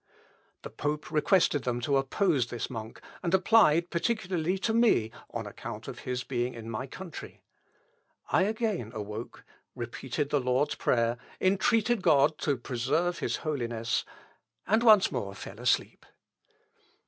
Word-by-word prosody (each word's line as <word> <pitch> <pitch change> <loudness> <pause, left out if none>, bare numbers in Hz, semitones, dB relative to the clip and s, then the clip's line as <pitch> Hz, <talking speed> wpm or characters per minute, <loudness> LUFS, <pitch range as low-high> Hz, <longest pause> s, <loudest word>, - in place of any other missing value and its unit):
The - - -7
pope 150 +1 -3
requested 155 -2 +3
them 120 -1 -1
to 140 +3 +2
oppose 135 - +1
this 120 0 -5
monk, 110 -2 -7 0.2
and 175 - -1
applied 180 -4 +4
particularly 180 -2 0
to 220 +4 -1
me, 220 - +3 0.2
on - - -5
account - - -8
of - - -7
his 125 -1 -3
being 120 -1 -2
in 115 0 -7
my 120 +5 -4
country. 175 +4 -9 0.9
I 185 - +4
again 215 - -2
awoke, 105 +2 -6 0.3
repeated 130 +4 -4
the 145 - +2
Lord's 130 +3 +1
Prayer, 115 0 +1 0.2
entreated 220 +4 +2
God 150 -1 +4
to 145 -3 0
preserve 135 +9 -1
his - - -1
Holiness, 120 -6 -1 0.6
and 220 +5 +3
once 215 -4 +6
more 100 -1 -4
fell - - -9
asleep. - - 0
145 Hz, 135 wpm, -29 LUFS, 120-185 Hz, 0.9 s, once